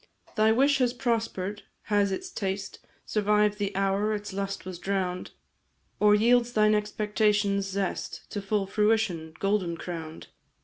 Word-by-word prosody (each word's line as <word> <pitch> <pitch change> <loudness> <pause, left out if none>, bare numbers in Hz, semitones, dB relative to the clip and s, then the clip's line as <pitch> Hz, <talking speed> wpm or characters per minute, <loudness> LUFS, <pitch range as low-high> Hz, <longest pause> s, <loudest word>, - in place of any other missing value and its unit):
"Thy 215 +1 +4
wish 275 +4 +3
has 245 -2 +2
prosper'd 225 -5 -2 0.2
has 205 -2 +1
its 365 - -4
taste 195 - -4 0.3
Survived 210 0 +2
the 200 -1 -2
hour 195 +2 +1
its 205 -1 -6
lust 195 -1 -4
was 185 -2 -7
drown'd; 185 -2 -2 0.7
Or 210 0 +6
yields 240 +2 +3
thine 215 0 +4
expectation's 210 -1 +1
zest 195 -1 -3
To 205 - -3
full 200 0 0
fruition, 195 -6 0
golden 195 -4 0
crown'd? 165 -2 -7
205 Hz, 135 wpm, -27 LUFS, 195-215 Hz, 0.7 s, Or